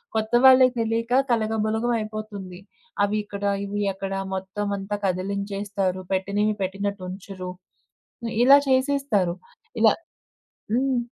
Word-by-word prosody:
కొత్త 220 +1 -1
వాళ్ళకి 255 -1 +7
తెలియక 230 +3 +1
కలగబులగం 220 +1 0
అయిపోతుంది. 215 -4 -6 0.4
అవి 205 +1 +1
ఇక్కడ 205 -1 -8 0.2
ఇవి 205 +1 -3
ఎక్కడ 195 0 -5 0.2
మొత్తం 190 +2 -3
అంతా 195 +2 -3
కదిలించేస్తారు, 195 0 -2
పెట్టినవి 200 +3 +1
పెట్టినట్టు 195 +1 -3
ఉంచరు 185 -1 -7 0.8
ఆహ్, - - -4
ఇలా 275 +2 +9
చేసేస్తారు. 260 -9 +1 0.5
ఇలా 220 -2 +6 0.8
హ్మ్. 255 0 +2
205 Hz, 110 wpm, -24 LUFS, 195-225 Hz, 0.8 s, ఇలా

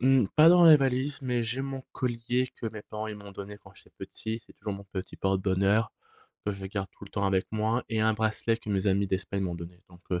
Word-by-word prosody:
mmh, 130 -2 +5
pas 155 +1 +9
dans 175 0 +7
les 160 -2 +10
valises, 135 +1 0
mais 125 -2 0
j'ai 120 +3 -2
mon 135 -1 -4
collier 125 +1 -1
que 115 - -2
mes 110 -1 -6
parents, 110 +1 -6
ils 110 -1 -5
m'ont 100 -1 -11
donné 100 +1 -8
quand - - -17
j'étais - - -19
petit, 110 +1 -5
c'est - - -16
toujours 105 0 -5
mon 100 0 -9
petit 95 -1 -7
porte-bonheur 95 +3 +1 0.5
que 105 - +1
je 95 -1 -6
garde 95 0 -3
tout - - -12
le - - -13
temps 100 - -1
avec 95 -1 +1
moi 110 +3 0
et 110 -2 0
un 110 0 +3
bracelet 110 +1 0
que 115 - -12
mes 100 0 0
amis 100 +1 +2
d'Espagne 95 +1 -2
m'ont 90 -2 -2
donné, 85 +1 -9
donc 90 -1 -17
heu, 90 - +1
110 Hz, 245 wpm, -28 LUFS, 95-120 Hz, 0.5 s, les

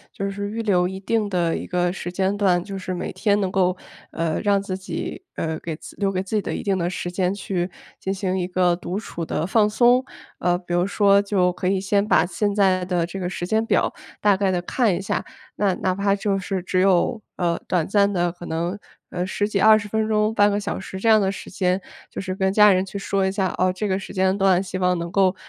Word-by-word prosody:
就 195 - -3
是 200 +1 -4
预 225 +2 -3
留 180 -4 +2
一 190 +1 -6
定 215 +1 0
的 175 -4 0
一 - - -5
个 180 0 0
时 180 -1 -5
间 190 +2 0
段， 180 -4 +2
就 195 0 -6
是 185 -1 -4
每 180 - -4
天 205 -2 +1
能 190 -2 -1
够， 185 -2 +2 0.3
呃， 165 -1 -1
让 200 -1 +2
自 195 -1 -4
己 190 - -5
呃， 160 -1 -2
给 160 -2 -5 0.2
留 200 -1 0
给 185 -1 -1
自 195 - -6
己 210 - +2
的 - - -4
一 - - -4
定 195 -2 +1
的 175 -1 -1
时 180 - -4
间 180 0 0
去 190 -3 -3 0.3
进 190 - -2
行 190 -1 -2
一 180 -1 -2
个 180 -1 +2
独 180 +2 -4
处 170 -6 -5
的 155 +1 -2
放 210 +2 +3
松。 245 +3 +4 0.4
呃， 175 0 +2
比 175 -1 -5
如 175 - +3
说 200 -1 +4
就 190 -3 +1
可 180 +1 -2
以 190 0 +1
先 200 +1 +1
把 210 - +4
现 205 +3 -1
在 190 -2 +2
的 180 -2 0
这 195 +3 -7
个 180 -1 -2
时 175 -1 -4
间 220 +3 +1
表 - - +1 0.3
大 205 -2 +4
概 195 -1 +1
地 180 -1 0
看 230 +2 +1
一 - - -3
下， 195 - -2 0.3
那 200 -2 +1
哪 185 -1 0
怕 200 +1 +1
就 200 0 0
是 190 0 -3
只 185 -1 0
有， 195 +4 +2
呃， 170 -2 0
短 170 -4 +1
暂 200 0 +3
的 175 -1 +1
可 175 0 -12
能， 170 +4 -2 0.3
呃， 180 0 -2
10 205 +2 -1
几 205 - -1
20 215 0 +6
分 220 +1 0
钟， 215 0 +1
半 205 -1 +4
个 205 - 0
小 - - -3
时 190 0 -7
这 225 - 0
样 220 -1 +7
的 190 -1 +1
时 - - -9
间， 185 0 0 0.3
就 - - -5
是 185 -1 -4
跟 190 0 0
家 210 +1 +7
人 185 0 +2
去 195 +1 -6
说 195 0 0
一 - - +1
下： 195 -1 0
“哦， 185 +1 +3
这 195 +3 -3
个 190 0 0
时 - - -8
间 190 +1 +2
段 190 -2 +3
希 185 -1 -6
望 180 -1 +1
能 170 0 -4
够， 190 -1 +3
190 Hz, 265 characters per minute, -23 LUFS, 180-205 Hz, 0.4 s, 样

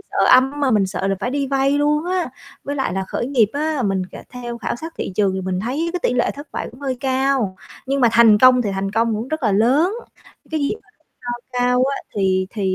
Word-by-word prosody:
sợ - - +2
âm 265 +3 +4
mà 275 - +2
mình 210 -4 +3
sợ 190 0 -3
là 195 - +1
phải 245 - -2
đi 280 0 -1
vay 275 0 +1
luôn 295 +2 +1
á. 365 -1 -1 0.4
Với 285 - -3
lại 270 -9 -1
là 190 0 -2
khởi 240 - -2
nghiệp 240 -7 +2
á, 300 -1 -1
mình 195 -3 0
cả - - -11
theo 240 -1 -6
khảo 240 - -3
sát 325 +5 -8
thị - - -3
trường 200 -2 +2
thì 190 - -2
mình 185 0 -2
thấy 290 +10 -2
cái 360 - -3
tỷ - - +1
lệ 245 - +1
thất 285 +1 -10
bại - - -4
cũng 250 +4 -17
hơi 265 -2 -2
cao. 260 -6 0 0.3
Nhưng 275 +1 0
mà 240 - +5
thành 225 -3 +6
công 255 0 +6
thì 205 - -2
thành 195 0 -2
công 225 +1 +1
cũng 225 +4 -4
rất 315 -2 -3
là 215 - +2
lớn, 270 - +3 0.6
cái 315 -1 -1
gì 280 - 0
mà - - -32 0.4
rủi 240 - -6
ro 245 - -1
cao 250 +1 +3
á 275 +1 0 0.2
thì 190 -1 +1
thì 215 - -6
250 Hz, 260 wpm, -20 LUFS, 210-280 Hz, 0.6 s, thành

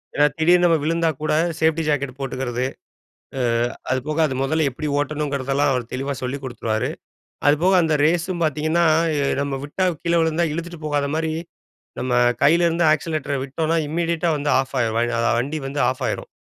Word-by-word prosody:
ஏனா, 145 - +5
திடீர்னு 175 +3 +4
நம்ம 165 -2 +4
விழுந்தா 165 +1 +1
கூட 155 - -1 0.3
சேஃப்டி 160 0 +2
ஜாக்கெட் 140 -3 -1
போட்டுக்குறது. 130 -2 -2 0.7
ஆ - - -2 0.5
அது 130 0 +1
போக 155 +1 -2
அது 135 - -3
முதல்ல 155 +3 +1
எப்டி 145 +4 -5
அ - - +1
ஓட்டணுங்கிறதெல்லாம் 145 -1 -1
அவர் 125 -2 -1
தெளிவா 135 +2 -2
சொல்லிக் 130 +2 -4
குடுத்துருவாரு. 120 0 -2 0.6
அது 145 +1 +5
போக 190 +2 +4
அந்த 160 -1 +1
ரேஸும் 170 +2 0
பார்த்தீங்கன்னா, 155 +3 +1 0.6
நம்ம 140 -1 -2
விட்டா 150 +6 -2 0.2
கீழே 170 0 +1
விழுந்தா 160 +1 +1
இழுத்துட்டு 170 +1 -6
போகாத 145 -1 0
மாரி 160 0 -1 0.7
நம்ம 125 0 -2 0.3
கையிலிருந்து 170 +3 +4
ஆக்ஸிலரேட்டரை 155 -2 -2
விட்டோம்னா 160 +4 -1
இமிடியேட்டா 170 +1 -1
வந்து 145 0 -1
ஆஃப் 135 +1 -3
ஆயிரும். 115 -1 0
வ - - +2 0.4
வண்டி 140 +6 -2
வந்து 140 +1 -3
ஆஃப் 130 +1 -3
ஆயிரும். - - -3
150 Hz, 165 wpm, -22 LUFS, 135-165 Hz, 0.7 s, ஏனா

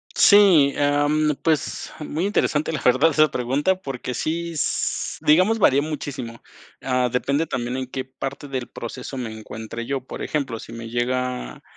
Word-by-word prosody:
Sí, 185 -9 +6
am, 145 +1 +2
pues 160 -3 -1
muy 155 +3 -2
interesante, 160 -6 +1
la - - -3
verdad, 130 +6 +4
esa 155 0 +4
pregunta, 140 +11 0
porque 130 -5 -5
sí, 170 +4 -2
s 150 - -2
digamos, 185 +9 +4
varía 140 -6 +5
muchísimo. 135 -6 -5 0.4
Ah, 125 -1 +1
depende 140 +5 0
también 125 -3 -3
en 130 -1 -3
qué 130 0 -5
parte 135 +2 -6
del 130 -3 -4
proceso 125 +3 -7
me 120 -3 -4
encuentre 110 +1 -7
yo. 135 0 -2
Por - - -7
ejemplo, 135 -7 -2
si 115 - -10
me 115 -1 -7
llega 125 - -2
135 Hz, 160 wpm, -23 LUFS, 125-155 Hz, 0.4 s, Sí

